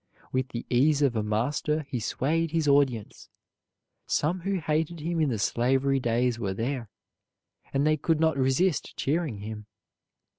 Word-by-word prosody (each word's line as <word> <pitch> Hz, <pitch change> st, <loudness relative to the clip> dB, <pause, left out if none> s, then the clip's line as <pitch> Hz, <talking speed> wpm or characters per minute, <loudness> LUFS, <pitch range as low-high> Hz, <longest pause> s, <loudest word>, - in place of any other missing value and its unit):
With 130 Hz, 0 st, 0 dB
the 120 Hz, -4 st, -5 dB
ease 145 Hz, +4 st, +3 dB
of 130 Hz, -4 st, +2 dB
a 110 Hz, -, +1 dB
master 130 Hz, +8 st, 0 dB
he 135 Hz, -3 st, -3 dB
swayed 160 Hz, +8 st, 0 dB
his 160 Hz, -1 st, 0 dB
audience. 135 Hz, -7 st, +1 dB, 0.8 s
Some 165 Hz, +5 st, +1 dB
who 195 Hz, +2 st, -1 dB
hated 160 Hz, +1 st, -1 dB
him 165 Hz, +2 st, -1 dB
in 150 Hz, -, +2 dB
the 115 Hz, -, -1 dB
slavery 135 Hz, +5 st, +1 dB
days 120 Hz, 0 st, 0 dB
were 95 Hz, -4 st, -2 dB
there, 120 Hz, 0 st, -3 dB, 0.8 s
and 140 Hz, +1 st, +1 dB
they 155 Hz, 0 st, +3 dB
could 160 Hz, +1 st, +1 dB
not 160 Hz, -2 st, +3 dB
resist 135 Hz, +6 st, +1 dB
cheering 145 Hz, -8 st, -1 dB
him. 105 Hz, 0 st, -7 dB
140 Hz, 155 wpm, -27 LUFS, 120-155 Hz, 0.8 s, ease